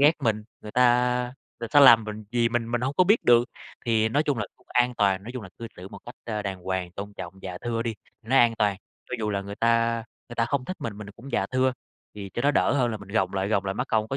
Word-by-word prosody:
ghét 150 +3 +7
mình, 110 -2 0 0.2
người 105 - -9
ta 125 0 +3 0.3
người 115 - -4
ta 145 +6 +5
làm 120 -5 +8
mình 105 0 -7
gì 120 -1 +3
mình 115 -1 -2
mình 120 - 0
hông 130 +3 -1
có 185 - +5
biết 210 +5 +3
được. 120 0 +6 0.4
Thì 110 -1 +3
nói 145 +6 +2
chung 145 -5 -1
là 110 - -2
cũng - - -29
an 125 0 +3
toàn, 95 -3 +2
nói 115 - -8
chung 125 - -6
là 95 - -9
cư 115 - -6
xử 90 +2 -9
một - - -10
cách, 120 - -8
ơ, 105 -2 -3
đàng 95 -2 -4
hoàng, 95 -1 -3
tôn 100 +2 -7
trọng, 90 -1 -7
dạ 90 -1 -6
thưa 115 -1 -1
đi, 115 -1 -3 0.3
nó 125 +5 0
an 120 -2 +5
toàn. 100 -2 +2 0.3
Cho - - -3
dù 105 -1 -1
là 100 -1 -1
người 100 +1 -7
ta 115 0 +1 0.2
người 120 - -8
ta 115 - +2
không 130 +1 -1
thích 185 - -5
mình, 105 -3 -5
mình 105 - -8
là 100 - -9
cũng 135 +4 -11
dạ - - +1
thưa, 130 0 +1 0.4
thì 100 -2 -7
cho 120 - -2
nó 145 - +4
đỡ 135 - +2
hơn 125 -4 +2
là 110 - -3
mình 100 -1 -12
gồng 100 -3 0
lại, 95 +1 -1
gồng 100 -3 +1
lại 95 0 -2
mắc - - -2
công 110 0 +1
có 135 - -2
115 Hz, 290 wpm, -26 LUFS, 100-125 Hz, 0.4 s, làm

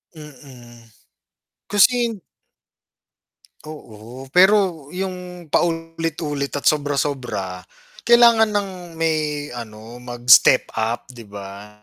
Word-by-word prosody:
Mm, 130 -6 -14 0.9
kasi 205 -1 +6 0.2
hind 225 -4 -4 1.5
Oo, 120 -3 -11
pero 185 -5 +3
yung 180 -1 -7
paulit-ulit 165 -3 -2
at 145 - -7
sobra-sobra, 140 -10 -1 0.4
kailangan 235 -2 +5
ng 205 -2 -2 0.3
may 155 -3 -2
ano 115 0 -10
mag-step 120 -1 +4
up, 115 +1 -2
di 125 -3 -13
ba? 100 -1 -10
145 Hz, 85 wpm, -20 LUFS, 120-175 Hz, 1.5 s, kasi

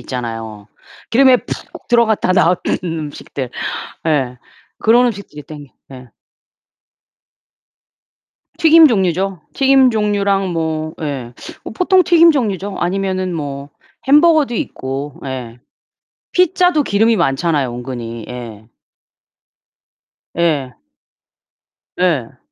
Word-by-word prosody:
있잖아요. 115 -4 -6 0.4
기름에 260 +1 +5
푹 - - -9
들어갔다 225 -5 +2
나온 180 -1 +3 0.3
음식들. 150 -5 -5 0.6
예. 135 -5 0 0.4
그런 240 +3 +4
음식들이 200 -10 -6
당겨 145 -3 -12 0.2
네. 130 -2 -12 2.5
튀김 325 -1 +7
종류죠. 190 - 0
튀김 270 -1 +4
종류랑 200 -3 0
뭐 160 -1 -3
예, 135 -6 -5 0.3
뭐 - - -8
보통 370 - +3
튀김 335 -1 +6
종류죠. 205 - -2
아니면은 185 0 -2
뭐 140 -3 -5 0.4
햄버거도 300 -3 +4
있고 135 -5 -5
예. 125 -3 -6 0.7
피자도 360 -3 +3
기름이 225 0 +2
많잖아요, 140 - 0
은근히. 120 -2 -7
예. 115 -4 -9 1.7
예. 150 -7 -1 1.2
네. 145 -9 -1
170 Hz, 200 characters per minute, -17 LUFS, -, 2.5 s, 튀김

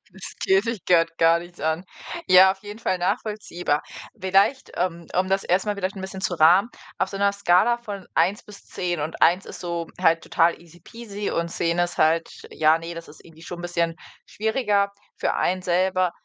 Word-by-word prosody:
„Das 190 +1 -10
geht 195 +3 +3
dich 230 -6 -4
grad 165 -2 +3
gar 165 0 +5
nichts 175 +1 -12
an.“ 160 +3 -1 0.4
Ja, 185 +1 +8
auf 190 - -15
jeden 210 +1 -9
Fall 185 -5 -1
nachvollziehbar. 180 -4 -2 0.4
Vielleicht, 195 +8 +2
ähm, 170 -2 -2
um 185 0 +1
das 195 0 0
erst 185 +4 +1
mal 210 - 0
vielleicht 190 0 -3
bisschen 190 0 -6
zu 180 -1 -1
rahmen: 175 +7 +5 0.3
Auf - - 0
so 195 - -6
'ner 200 0 +2
Skala 200 +4 +3
von 205 -5 -8
1 185 +5 +2
bis 205 -1 -14
10, 175 -3 -3
und 155 +2 -5
1 180 +3 +4
ist - - -9
so 170 -1 -3
halt 165 0 +3
total 170 +1 +1
easy 170 0 -18
peasy 210 +1 -6
und 170 0 -1
10 170 +1 -1
ist 175 0 -1
halt, 165 +1 +3 0.2
ja, 155 +1 +3
ne, 165 +1 -7
das 165 0 -9
ist 150 - -15
irgendwie 165 -1 -16
schon 175 0 -7
bisschen 170 -1 -1 0.3
schwieriger 210 -2 0 0.3
für - - -1
einen 185 +1 0
selber. 185 +1 +1
180 Hz, 195 wpm, -24 LUFS, 170-200 Hz, 0.4 s, Ja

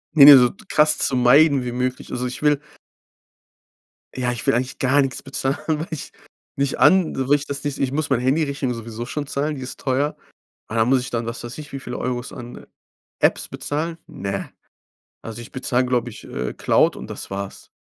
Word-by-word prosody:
Ne, 140 -3 +10
ne, 145 -2 +12
so 125 -1 +5 0.2
krass 150 0 +3
zu 135 - +1
meiden 135 +2 +5
wie 120 - -3
möglich. 125 +1 -3
Also, 125 0 -2
ich 125 +4 -7
will 150 -1 +4 1.6
Ja, 125 -1 0
ich 120 - -4
will - - +3
eigentlich 125 +2 -1
gar 135 +2 +3
nichts 135 -2 -3
bezahlen, 135 0 -2
weil 160 +1 -1
ich 160 -4 -6 0.4
nicht 140 0 -1
an 185 -3 +5
weil 145 - +5
ich 145 0 -3
das 140 0 -5
nicht 145 -2 -3
ich 135 -2 0
muss 145 0 -2
meine 125 - +2
Handyrechnung 140 0 0
sowieso 115 0 -7
schon 150 +2 -3
zahlen, 145 +2 -2
die 130 - -7
ist 130 - -8
teuer. 140 +3 0 0.5
Aber 110 - -3
dann 110 - +3
muss 130 0 +4
ich 130 +2 -6
dann, 115 -2 -2
was 115 +1 -5
weiß 120 +4 -7
ich 150 -1 -9
wie 135 - -5
viele 125 -1 -6
Euros, 125 -1 -3
an 120 0 -9 0.6
Apps - - +2
bezahlen? 165 +3 -3
Ne, 95 0 -5 0.7
also, 115 +1 -7
ich 120 - -11
bezahl, 130 -1 0
glaube 125 -1 0
ich, - - -12
äh, 65 - -4
Cloud - - +2
und - - -9
das - - -7
war's. 100 0 -6
130 Hz, 205 wpm, -22 LUFS, 120-145 Hz, 1.6 s, ne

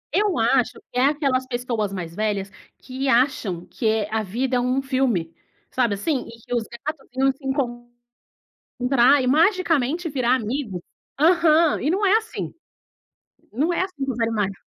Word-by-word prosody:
Eu 410 -6 +2
acho 240 +2 +2 0.2
que 250 - -1
é 260 - +4
aquelas 275 -3 +1
pessoas 240 -5 -2
mais 175 -4 -5
velhas, 205 -2 -2 0.3
que 265 +1 -4
acham 235 -9 +1
que 220 -3 -1
a 220 0 0
vida 245 +6 -1
é - - +2
um 250 +2 +1
filme, 255 -11 0 0.4
sabe 240 -5 +1
assim. 260 +6 -2
E 230 - -12
que - - -5
os 235 - +1
gatos 275 +5 -7
iam 270 0 +4
se 270 +2 -18
encontrar 240 -3 -4 1.1
e - - 0
magicamente 330 - +2
virar 255 -3 +2
amigo. 225 -6 -3 0.4
Aham, 325 0 +4
e 285 - 0
não 390 +5 +1
é 395 +2 +5
assim. 445 0 -5 1.0
Não 305 +10 0
é - - 0
assim 365 -8 -3
com 265 - -2
os 240 - -7
animais. 215 -4 0
255 Hz, 165 wpm, -23 LUFS, 225-290 Hz, 1.1 s, é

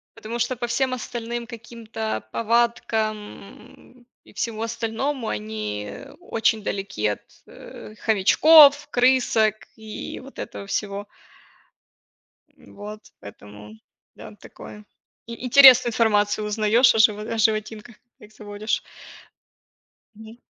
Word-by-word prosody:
Потому 225 +1 -7
что 255 +2 -1
по 240 0 -4
всем 255 +2 -1
остальным 240 -1 -6
каким-то 225 - -7
повадкам, 230 -1 0
м, 210 +4 -15 0.2
и - - -19
всему 225 -2 -4
остальному, 230 +3 -3
они 105 -1 -5 0.3
очень 225 -9 -1
далеки 195 - -3
от, 105 - -3 0.3
э, 215 - -13
хомячков, 290 +8 +5
крысок 245 -4 +2 0.2
и 220 -1 -8
вот 270 +1 -13
этого 200 -4 -8
всего. 200 0 -4 1.5
Вот, 210 +1 -11 0.2
поэтому 105 +1 -13 0.4
да, - - -12
такое. 210 0 -13 0.4
И 235 +2 -8
интересную 255 -1 +7
информацию 210 -2 +1
узнаёшь 215 +4 +3
о 225 - +1
живо 210 -1 +3
о 225 +1 -5
животинках, 215 +1 -1
когда 240 -3 -21
их 210 - -21
заводишь. 210 +1 -4 1.3
Мгм. 220 +2 -13
220 Hz, 110 wpm, -23 LUFS, 210-240 Hz, 1.5 s, интересную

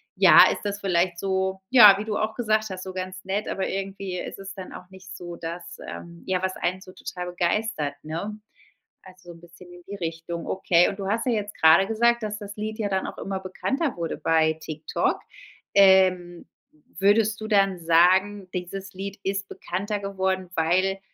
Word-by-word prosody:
ja, - - +8
ist - - -5
das 205 0 -3
vielleicht 175 -2 +1
so 190 0 -1
ja, 215 -6 +9
wie 215 - -4
du 215 -1 -2
auch 215 +1 -1
gesagt 215 -2 0
hast, 185 0 -6
so 185 0 -7
ganz 185 0 -6
nett, 200 +2 -2
aber 195 - -2
irgendwie 195 -1 -4
ist - - -7
es 195 +1 -8
dann 190 -1 -9
auch 180 0 -11
nicht 190 0 -12
so, 175 -2 -8
das, 170 +1 -7
ähm, 170 0 -9
ja, 185 -1 -1
was 190 0 -2
einen 185 +2 -2
so 185 -1 -13
total 180 -1 -7
begeistert, 175 -3 -1
ne? 170 +7 -5 0.7
Also 185 -2 -14
'n 170 - -14
bisschen 175 +1 -15
in 175 0 -13
die 200 - -6
Richtung. 165 -1 -5
Okay. 175 -2 +3
Und 200 0 -7
du 195 - -4
hast 225 +4 -1
ja 250 - +1
jetzt 210 -1 -3
grade 160 +5 +6
gesagt, 235 +1 +2
dass 210 0 -3
das 205 -1 -9
Lied 215 +1 -4
ja 205 -2 -1
dann 190 -1 -1
auch - - -8
immer 195 -1 -4
bekannter 270 - -2
wurde 165 -1 -3
bei 160 -1 +2
TikTok. 155 0 -2 0.5
Ähm, 185 -3 +4 0.5
würdest 215 +2 +3
du 215 - -4
dann 195 -4 +2
sagen, 185 +4 +3
dieses 190 +2 -6
Lied 195 +1 -6
ist 195 0 -2
bekannter 200 +3 -4
geworden, 190 -2 -2
weil 185 +4 +1
190 Hz, 190 wpm, -25 LUFS, 175-200 Hz, 0.7 s, ja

